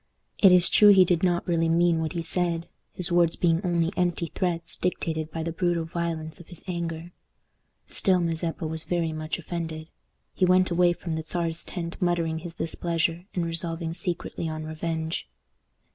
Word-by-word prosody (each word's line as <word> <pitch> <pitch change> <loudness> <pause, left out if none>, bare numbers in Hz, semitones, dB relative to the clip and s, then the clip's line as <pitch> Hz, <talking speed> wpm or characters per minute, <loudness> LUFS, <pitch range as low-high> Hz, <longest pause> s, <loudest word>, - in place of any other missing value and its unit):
It 195 - +8
is 180 -1 +7
true 210 - +7
he 190 -2 +8
did 175 -2 +1
not 175 -2 +1
really 165 -2 +2
mean 170 0 +3
what 160 +1 -2
he 170 -1 -3
said, 170 0 -1 0.2
his 180 0 -3
words 170 -1 +3
being 170 -1 +2
only 170 -1 +1
empty 175 -2 0
threats 170 -2 -2
dictated 160 -3 -2
by 160 +1 -4
the 165 - -2
brutal 170 -1 0
violence 165 -1 -4
of 175 - -13
his 175 - -12
anger. 170 -1 -4 0.8
Still, 185 -3 +2
Mazeppa 165 -1 -2
was 160 0 -3
very 170 -2 -1
much 155 0 -3
offended. 165 -2 -5 0.4
He - - -1
went 185 0 +4
away 175 0 +4
from 170 0 -7
the 160 0 -1
Czar's 165 0 -1
tent 170 0 -6
muttering 170 -2 0
his 170 0 -8
displeasure, 165 +1 -1
and 175 -2 0
resolving 165 0 -2
secretly 170 -2 -3
on 155 0 -5
revenge. 160 - -3
170 Hz, 175 wpm, -26 LUFS, 165-175 Hz, 0.8 s, It